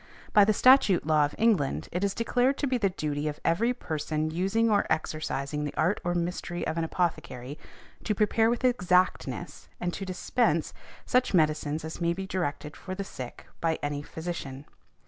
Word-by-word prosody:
By 205 Hz, -1 st, +7 dB
the 215 Hz, -, +3 dB
statute 215 Hz, -, +5 dB
law 155 Hz, -1 st, +4 dB
of 145 Hz, -, -6 dB
England 210 Hz, -12 st, +1 dB
it 180 Hz, +3 st, -2 dB
is 200 Hz, -1 st, 0 dB
declared 245 Hz, +3 st, +1 dB
to -, -, -1 dB
be 255 Hz, -2 st, 0 dB
the 200 Hz, -3 st, +2 dB
duty 150 Hz, -4 st, -3 dB
of 150 Hz, -1 st, -4 dB
every 215 Hz, +9 st, +2 dB
person 155 Hz, -7 st, -2 dB
using 195 Hz, +7 st, +1 dB
or 210 Hz, -2 st, +2 dB
exercising 155 Hz, -2 st, -2 dB
the 145 Hz, -, -4 dB
art 175 Hz, +6 st, +1 dB
or 175 Hz, 0 st, -1 dB
mystery 175 Hz, 0 st, -2 dB
of 160 Hz, -, -2 dB
an 165 Hz, -, 0 dB
apothecary 155 Hz, -6 st, -3 dB, 0.5 s
to 210 Hz, -, 0 dB
prepare 220 Hz, +2 st, +3 dB
with 240 Hz, +1 st, -1 dB
exactness, 185 Hz, -7 st, +1 dB
and 175 Hz, 0 st, -2 dB
to 195 Hz, -, -5 dB
dispense, 180 Hz, -3 st, 0 dB, 0.3 s
such 250 Hz, -5 st, +2 dB
medicines 155 Hz, -1 st, +1 dB
as 160 Hz, +2 st, -7 dB
may 170 Hz, 0 st, +2 dB
be 190 Hz, +2 st, -5 dB
directed 155 Hz, -5 st, -3 dB
for 185 Hz, -1 st, -7 dB
the 200 Hz, -, -3 dB
sick 130 Hz, -10 st, -8 dB, 0.2 s
by 165 Hz, -1 st, +1 dB
any 145 Hz, 0 st, -2 dB
physician. 150 Hz, -4 st, -6 dB
175 Hz, 180 wpm, -28 LUFS, 155-200 Hz, 0.5 s, By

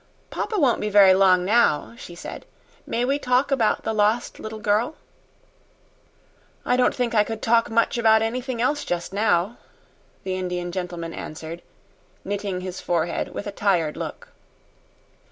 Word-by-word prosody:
"Papa 430 Hz, -, -2 dB
won't 265 Hz, -7 st, +2 dB
be 210 Hz, -, -1 dB
very 200 Hz, -2 st, +7 dB
long 185 Hz, -1 st, +4 dB
now," 215 Hz, -5 st, +2 dB
she 175 Hz, -7 st, -10 dB
said. -, -, -9 dB, 0.4 s
"May 240 Hz, +1 st, 0 dB
we 275 Hz, +3 st, 0 dB
talk 255 Hz, +1 st, +1 dB
about 235 Hz, -6 st, +1 dB
the 225 Hz, -, -1 dB
lost 215 Hz, +3 st, +1 dB
little 220 Hz, 0 st, -6 dB
girl?" 215 Hz, +7 st, 0 dB, 1.7 s
"I 245 Hz, -, +2 dB
don't 250 Hz, 0 st, +2 dB
think 245 Hz, -2 st, -1 dB
I 210 Hz, -2 st, +5 dB
could 225 Hz, +1 st, -5 dB
talk 230 Hz, +1 st, +2 dB
much 230 Hz, +1 st, +1 dB
about 220 Hz, -1 st, +5 dB
anything 250 Hz, +2 st, -3 dB
else 290 Hz, +5 st, 0 dB
just 175 Hz, +1 st, -3 dB
now," 205 Hz, 0 st, +1 dB, 0.7 s
the 185 Hz, -1 st, -2 dB
Indian 180 Hz, -1 st, -3 dB
gentleman 175 Hz, -2 st, -5 dB
answered, 160 Hz, +2 st, -7 dB, 0.6 s
knitting 200 Hz, -2 st, -3 dB
his 185 Hz, 0 st, -6 dB
forehead 170 Hz, -1 st, -1 dB
with -, -, -5 dB
a 205 Hz, -, -4 dB
tired 180 Hz, -7 st, 0 dB
look. -, -, -7 dB
210 Hz, 155 wpm, -23 LUFS, 180-235 Hz, 1.7 s, very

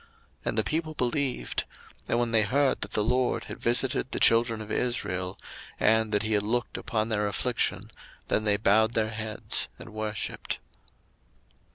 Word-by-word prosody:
02:004:031 465 Hz, -, -27 dB, 0.4 s
And -, -, -1 dB
the -, -, +3 dB
people 155 Hz, 0 st, -2 dB
believed: 130 Hz, +1 st, 0 dB, 0.4 s
and -, -, +1 dB
when 120 Hz, -1 st, 0 dB
they 115 Hz, -1 st, +4 dB
heard 135 Hz, +6 st, +2 dB
that 105 Hz, -, -4 dB
the 105 Hz, -, +2 dB
LORD 125 Hz, +3 st, +1 dB
had -, -, -8 dB
visited 130 Hz, +2 st, +2 dB
the -, -, -2 dB
children 115 Hz, -1 st, +4 dB
of 110 Hz, 0 st, -7 dB
Israel, 95 Hz, -6 st, -1 dB, 0.4 s
and 110 Hz, 0 st, +3 dB
that 105 Hz, 0 st, +2 dB
he 110 Hz, 0 st, -1 dB
had 105 Hz, -, +3 dB
looked 120 Hz, +4 st, -1 dB
upon 110 Hz, -1 st, -1 dB
their 105 Hz, -2 st, +1 dB
affliction, 110 Hz, -1 st, -1 dB, 0.4 s
then 110 Hz, -, +1 dB
they 105 Hz, -1 st, +3 dB
bowed 110 Hz, +2 st, +3 dB
their 110 Hz, -1 st, +1 dB
heads 110 Hz, -1 st, 0 dB
and 110 Hz, -, -11 dB
worshipped. 110 Hz, -2 st, -3 dB
110 Hz, 170 wpm, -28 LUFS, 105-120 Hz, 0.4 s, they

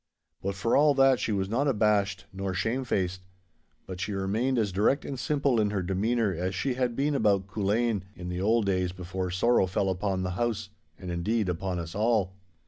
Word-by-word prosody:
But 100 Hz, 0 st, -2 dB
for 100 Hz, +4 st, +1 dB
all 145 Hz, 0 st, +5 dB
that 135 Hz, -1 st, +5 dB
she -, -, -1 dB
was 95 Hz, -2 st, 0 dB
not 125 Hz, +8 st, 0 dB
abashed 105 Hz, -5 st, +1 dB
nor 95 Hz, -1 st, -3 dB
shame 110 Hz, +7 st, -1 dB
faced. 95 Hz, -6 st, -1 dB, 0.6 s
But 95 Hz, -1 st, -7 dB
she 105 Hz, -, -2 dB
remained 110 Hz, +7 st, 0 dB
as 105 Hz, -4 st, +1 dB
direct 105 Hz, +9 st, +1 dB
and 135 Hz, -2 st, -5 dB
simple 140 Hz, -5 st, +1 dB
in 105 Hz, -, +1 dB
her 100 Hz, -3 st, -1 dB
demeanour 105 Hz, +3 st, 0 dB
as 90 Hz, +2 st, -2 dB
she 130 Hz, +7 st, -1 dB
had 125 Hz, -2 st, -1 dB
been 145 Hz, +3 st, +1 dB
about 100 Hz, -8 st, +2 dB
Culzean, 105 Hz, +1 st, 0 dB
in 90 Hz, -, -7 dB
the 90 Hz, 0 st, -3 dB
old 110 Hz, +2 st, +2 dB
days 90 Hz, -2 st, 0 dB
before 95 Hz, 0 st, -4 dB
sorrow 95 Hz, +3 st, +3 dB
fell 95 Hz, +1 st, 0 dB
upon 95 Hz, 0 st, -1 dB
the 90 Hz, -, -2 dB
house, 110 Hz, +1 st, -2 dB, 0.3 s
and, 90 Hz, -1 st, -6 dB
indeed, 100 Hz, +4 st, 0 dB
upon 90 Hz, +1 st, -2 dB
us 85 Hz, -1 st, -5 dB
all. 105 Hz, -3 st, +1 dB
100 Hz, 200 wpm, -28 LUFS, 95-120 Hz, 0.6 s, all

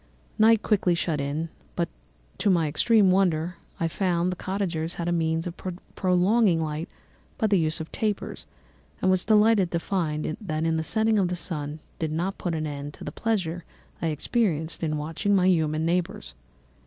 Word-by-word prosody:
"Night 220 Hz, 0 st, +5 dB
quickly 190 Hz, -5 st, +2 dB
shut 165 Hz, -4 st, -1 dB
in, 150 Hz, +4 st, -2 dB, 0.3 s
but -, -, 0 dB, 0.5 s
to -, -, +2 dB
my 170 Hz, -4 st, +3 dB
extreme 195 Hz, +6 st, +4 dB
wonder, 175 Hz, -2 st, +1 dB, 0.2 s
I 165 Hz, -, +1 dB
found 175 Hz, 0 st, 0 dB
that 180 Hz, -, -6 dB
the -, -, -10 dB
cottagers 180 Hz, -4 st, -2 dB
had 170 Hz, -, -3 dB
a -, -, +1 dB
means 165 Hz, -1 st, 0 dB
of 175 Hz, -1 st, -5 dB, 0.4 s
prolonging 185 Hz, 0 st, +3 dB
light 155 Hz, +1 st, -3 dB, 0.5 s
by 225 Hz, -, +1 dB
the 200 Hz, -3 st, +3 dB
use 160 Hz, 0 st, +1 dB
of 160 Hz, -, -6 dB
tapers, 210 Hz, -2 st, -3 dB, 0.5 s
and 185 Hz, -, +3 dB
was 185 Hz, -1 st, +1 dB
delighted 215 Hz, -3 st, +4 dB
to 170 Hz, -, -1 dB
find 160 Hz, -5 st, -1 dB
that 155 Hz, -, -3 dB, 0.4 s
the -, -, -1 dB
setting 220 Hz, +4 st, +2 dB
of 190 Hz, -, +2 dB
the 180 Hz, -, -2 dB
sun 155 Hz, -3 st, -5 dB, 0.2 s
did 160 Hz, -2 st, -1 dB
not 175 Hz, +5 st, -2 dB
put 175 Hz, -2 st, -2 dB
an 155 Hz, -1 st, -2 dB
end 145 Hz, -1 st, -5 dB
to -, -, -11 dB
the -, -, -5 dB
pleasure 180 Hz, -5 st, -1 dB, 0.4 s
I 165 Hz, -, 0 dB
experienced 160 Hz, -, -1 dB
in 155 Hz, -2 st, 0 dB
watching 165 Hz, +7 st, 0 dB
my 185 Hz, -2 st, +3 dB
human 160 Hz, -3 st, +2 dB
neighbours. 170 Hz, -, -1 dB
170 Hz, 180 wpm, -26 LUFS, 160-195 Hz, 0.5 s, Night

